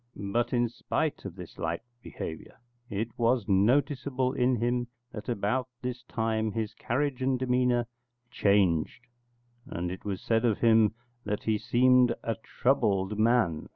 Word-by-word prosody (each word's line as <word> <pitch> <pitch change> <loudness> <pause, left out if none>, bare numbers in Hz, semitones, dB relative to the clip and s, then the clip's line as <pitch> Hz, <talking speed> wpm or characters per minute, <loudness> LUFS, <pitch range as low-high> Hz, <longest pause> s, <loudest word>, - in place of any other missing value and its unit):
But 115 +4 -1
in 120 -1 +2
spite 145 +5 -2
of 95 -3 -6
this 90 -3 -11
light 85 +3 -2 0.2
behaviour, 80 -7 -8 0.3
it 110 +3 -2
was 120 -2 +2
noticeable 130 +5 +2
in 125 -1 +2
him 120 +1 0 0.2
that 105 +1 -7
about 120 +3 0 0.2
this 125 0 -3
time 110 -2 -1
his 110 -2 -2
carriage 130 +1 -2
and 130 0 +1
demeanour 125 -1 +2 0.5
changed, 100 +1 +2 0.6
and 90 +1 -3
it 95 - -7
was 100 -2 -3
said 115 0 +1
of 115 -4 +2
him 110 -2 +4 0.3
that 105 0 -3
he 110 -1 +1
seemed 125 +1 +4
a 115 - 0
troubled 105 -4 0
man. 110 -9 +2
115 Hz, 145 wpm, -29 LUFS, 100-125 Hz, 0.6 s, him